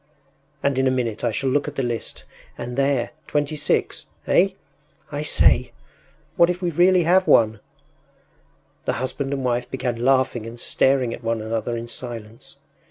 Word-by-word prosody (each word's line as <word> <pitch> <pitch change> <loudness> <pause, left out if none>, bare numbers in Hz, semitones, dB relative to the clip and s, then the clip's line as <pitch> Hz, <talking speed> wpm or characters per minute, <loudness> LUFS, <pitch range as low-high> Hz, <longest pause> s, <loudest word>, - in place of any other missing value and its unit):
And 140 -2 +1
in 130 - +3
a - - +4
minute 120 -4 -2
I - - +2
shall 135 -1 -1
look 145 +2 +1
at 150 - -6
the 135 - -1
list, 120 -2 -4 0.3
and 125 0 -5
there 135 -3 +1 0.2
26! 145 0 -1 0.2
Eh? 185 - +4 0.6
I 145 0 -3
say, 150 - +3 0.6
what 170 - +6
if 180 0 -1
we 175 -2 -1
really 180 +2 +4
have 185 +3 +3
won?” 110 -2 +4 1.3
The - - 0
husband 135 +1 -3
and 135 -2 -2
wife 125 0 -1
began 125 -3 -3
laughing 130 -3 +2
and 115 +1 -9
staring 130 -2 +1
at - - -9
one 115 0 -1
another 115 +2 -2
in 115 +1 -6
silence. 115 -2 -8
130 Hz, 165 wpm, -23 LUFS, 120-145 Hz, 1.3 s, what